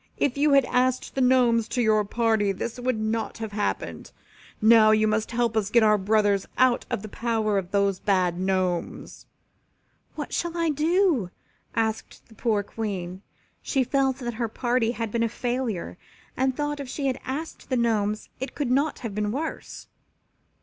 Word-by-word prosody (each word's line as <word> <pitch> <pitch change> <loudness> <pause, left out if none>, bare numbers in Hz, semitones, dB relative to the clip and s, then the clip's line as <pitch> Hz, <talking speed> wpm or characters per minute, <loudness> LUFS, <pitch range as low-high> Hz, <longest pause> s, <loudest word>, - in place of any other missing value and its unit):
"If 275 - +1
you 290 +1 +3
had 275 -2 +5
asked 255 +1 0
the 270 - -1
Gnomes 245 -3 +3
to 250 - -3
your 215 -2 +3
party 220 -1 +1
this 230 +5 -5
would 250 -2 -1
not 220 0 -2
have 220 -2 -5
happened. 205 0 -3 0.5
Now 220 0 +6
you 215 0 +4
must 215 0 0
help 235 -1 0
us 215 -3 +1
to - - -10
get 235 -2 +6
our 210 -1 +4
brothers 205 0 +2
out 255 -1 +3
of 195 - -3
the - - -6
power 220 -2 0
of 180 -2 -7
those 200 -1 +1
bad 180 -3 +1
Gnomes. 185 -2 -2 0.9
"What - - -6
shall 345 0 -2
I 335 -2 +1
do?" 310 - +2 0.5
asked 220 -1 -2
the - - -16
poor 215 -2 0
Queen. 190 -4 -5 0.4
She 270 -3 0
felt 265 0 +1
that 240 -3 -4
her 230 - +1
party 240 +1 0
had 230 -3 -4
been 235 - -1
a 230 - +1
failure 240 -7 -3 0.4
and 260 0 0
thought 295 0 -2
if 275 -3 -6
she 280 +2 -4
had 265 -1 0
asked 295 +5 -6
the 255 - +1
Gnomes 215 -3 0
it 260 0 -5
could 280 -4 -1
not 285 +4 +1
have 220 - -4
been 210 0 -1
worse. 305 +7 -5
230 Hz, 180 wpm, -25 LUFS, 210-255 Hz, 0.9 s, Now